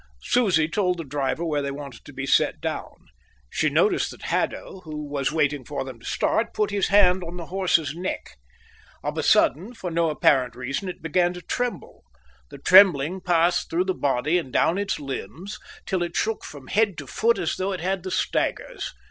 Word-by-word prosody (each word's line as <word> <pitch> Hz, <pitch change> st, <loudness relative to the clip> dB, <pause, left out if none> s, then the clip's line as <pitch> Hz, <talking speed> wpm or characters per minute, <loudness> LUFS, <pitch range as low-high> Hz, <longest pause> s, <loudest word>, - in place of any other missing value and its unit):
Susie 185 Hz, -10 st, +3 dB
told 180 Hz, 0 st, 0 dB
the 165 Hz, -, -4 dB
driver 145 Hz, +3 st, -2 dB
where 150 Hz, -3 st, 0 dB
they 140 Hz, -, -2 dB
wanted 140 Hz, -4 st, -8 dB
to -, -, -12 dB
be -, -, -5 dB
set -, -, +2 dB
down. -, -, -4 dB, 0.6 s
She -, -, +1 dB
noticed -, -, +2 dB
that -, -, -11 dB
Haddo, 190 Hz, -, -2 dB
who 155 Hz, -4 st, -7 dB
was 140 Hz, -1 st, -1 dB
waiting 145 Hz, -3 st, 0 dB
for 140 Hz, +3 st, -4 dB
them 130 Hz, -3 st, -9 dB
to -, -, -16 dB
start, 230 Hz, 0 st, 0 dB
put 210 Hz, -1 st, +1 dB
his 200 Hz, -1 st, +1 dB
hand 185 Hz, -2 st, +5 dB
on 170 Hz, +1 st, -7 dB
the 170 Hz, -, -6 dB
horse's 170 Hz, -7 st, +2 dB
neck. 180 Hz, +3 st, -5 dB, 0.7 s
On -, -, -3 dB
a -, -, -1 dB
sudden, 195 Hz, -, +3 dB
for 180 Hz, -5 st, -5 dB
no 165 Hz, 0 st, +2 dB
apparent 130 Hz, -5 st, +2 dB
reason, 135 Hz, +9 st, -3 dB
it 180 Hz, -, -9 dB
began 175 Hz, +2 st, +2 dB
to 180 Hz, -, -8 dB
tremble. 245 Hz, -1 st, -4 dB, 0.5 s
The -, -, -10 dB
trembling 185 Hz, -2 st, +6 dB
passed 175 Hz, 0 st, +2 dB
through 175 Hz, +3 st, +1 dB
the 190 Hz, -, 0 dB
body 145 Hz, +2 st, +1 dB
and 135 Hz, -7 st, -7 dB
down 170 Hz, +9 st, +2 dB
its 205 Hz, -, -1 dB
limbs 145 Hz, -, -6 dB, 0.3 s
till 185 Hz, -3 st, -1 dB
it 175 Hz, 0 st, -2 dB
shook 225 Hz, 0 st, -1 dB
from 145 Hz, -3 st, -10 dB
head 205 Hz, +1 st, +1 dB
to 145 Hz, -, -6 dB
foot 230 Hz, -, +1 dB
as 170 Hz, -, -1 dB
though 190 Hz, +1 st, -1 dB
it 185 Hz, -4 st, -4 dB
had 190 Hz, +1 st, -1 dB
the 185 Hz, -, -5 dB
staggers. -, -, -2 dB
170 Hz, 200 wpm, -24 LUFS, 145-190 Hz, 0.7 s, trembling